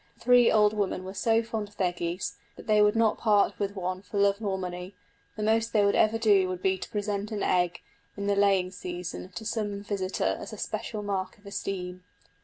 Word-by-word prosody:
The - - -30
three 245 -1 +6
old 210 -1 +4
women 200 -3 -1
were 190 +1 -7
so 225 +3 +2
fond 220 -2 -4
of 205 - -24
their 180 -2 +2
geese 175 +1 -3 0.2
that - - -12
they 215 -1 +4
would 210 +1 +4
not 225 -1 +2
part 210 -3 +3
with 200 0 -2
one 185 0 -3
for 205 - -6
love 200 +1 +3
or 195 -2 0
money; 180 +1 -6 0.4
the 215 - -4
most 225 +1 +1
they 210 -2 +4
would 200 - +3
ever 220 +1 +3
do 205 -5 +4
would 185 -1 -5
be 190 0 +3
to - - -7
present 205 0 -2
an 210 -2 -2
egg, 180 -1 +1 0.4
in 200 - -3
the 200 0 +2
laying 195 -2 +3
season, 180 -1 -6
to 200 +5 -7
some 205 -3 -2
visitor 195 -2 -1
as - - -8
a - - -7
special 215 0 -4
mark 190 -2 -3
of 205 - -25
esteem. 185 -2 -5
200 Hz, 220 wpm, -28 LUFS, 185-215 Hz, 0.4 s, three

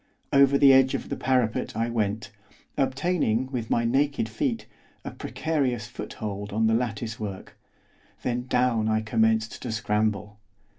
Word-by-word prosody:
Over 140 0 +6
the 140 -1 +7
edge 130 0 +5
of - - -5
the - - -2
parapet 125 -6 0
I 115 +1 0
went, 105 -2 -2 0.4
obtaining, 135 -3 0
with 120 -4 -3
my 115 - +1
naked 135 0 +1
feet, 225 - -2 0.4
a - - -4
precarious 135 -9 -2
foothold 105 -3 -6
on 110 +2 +1
the 110 - +3
latticework, 110 -4 -3 0.7
then 125 0 -2
down 125 -4 +2
I 110 0 +1
commenced 110 0 +1
to 125 - -4
scramble. 105 -1 -1
115 Hz, 140 wpm, -26 LUFS, 110-130 Hz, 0.7 s, the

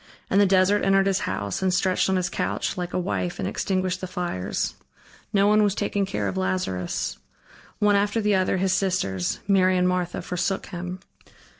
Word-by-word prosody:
And 195 - +5
the 200 - +5
desert 190 +2 +3
entered 195 0 +4
his 195 -1 +2
house, 100 -1 -3
and 190 -1 +2
stretched 185 +1 +1
on 190 - +2
his 180 -1 +1
couch, 175 - -2
like 180 -1 -4
a - - -2
wife 180 -1 -2
and - - -2
extinguished 185 -1 -1
the 185 - -4
fires. 175 - -3 0.6
No 200 -2 +3
one 210 +1 +5
was 205 -1 +2
taking 200 -1 -1
care 105 - -2
of 95 -1 -3
Lazarus. 95 -1 -2 0.6
One 205 -1 +3
after 205 +3 +1
the 210 -1 +2
other, 190 0 +2
his 190 0 +1
sisters 180 - -1
Mary 185 -2 +4
and 180 0 +3
Martha 180 -1 -1
forsook 180 +2 -2
him. 180 0 -6
185 Hz, 185 wpm, -24 LUFS, 175-195 Hz, 0.6 s, And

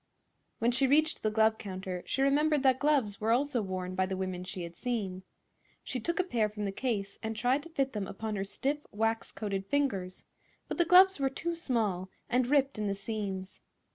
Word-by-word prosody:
When 235 +2 +2
she 265 +2 +3
reached 310 +3 +3
the 215 - +1
glove 220 0 +3
counter 185 -2 -5
she 270 - +1
remembered 295 +1 +3
that 260 -1 +4
gloves 270 -10 +1
were 220 - 0
also 255 +1 +2
worn 185 -2 -4
by 185 0 +1
the 190 0 -3
women 185 -1 -3
she 185 -1 -6
had 170 0 -8
seen. 205 -7 -3 0.6
She 255 - -3
took 340 +10 -2
a - - +4
pair 230 - 0
from 210 0 -4
the 195 - -1
case 200 -3 -3
and 220 0 -3
tried 245 +6 +2
to 335 - -12
fit 275 -4 -1
them 205 -3 -3
upon 215 +2 -4
her 195 - -1
stiff, 275 +9 -2
wax 225 +2 -1
coated 195 -2 -3
fingers; 200 -11 -1 0.4
but - - -5
the 345 - +5
gloves 370 +1 +7
were 270 -1 +2
too 340 +5 -3
small 215 - -1 0.2
and 250 0 +3
ripped 275 -3 +2
in 210 - -1
the 200 - 0
seams. 195 -2 -5
220 Hz, 205 wpm, -31 LUFS, 195-275 Hz, 0.6 s, gloves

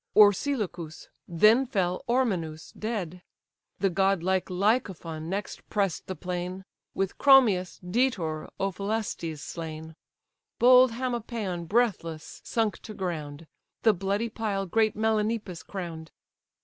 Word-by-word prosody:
Orsilochus; 205 - +2 0.2
then 215 +9 +4
fell 185 -7 -1
Ormenus 180 -11 0
dead: 190 -6 -4 0.6
The 195 -2 +1
godlike 190 0 +1
Lycophon 180 -5 -1
next 200 +2 -5
press'd 200 -5 -1
the 185 - -4
plain, 180 +1 -5 0.3
With 195 -1 -2
Chromius, 230 -10 +5
Daetor, 180 -6 -1
Ophelestes 195 -5 -2
slain: 160 -1 -7 0.6
Bold 250 0 +7
Hamopaon 230 -7 -3
breathless 170 -7 -1
sunk 225 -3 -1
to 215 - -10
ground; 165 -5 -4 0.4
The 220 - +6
bloody 200 +4 -1
pile 210 -3 -2
great 215 +3 +2
Melanippus 215 -4 0
crown'd. 165 -5 -6
195 Hz, 105 wpm, -27 LUFS, 170-220 Hz, 0.6 s, Bold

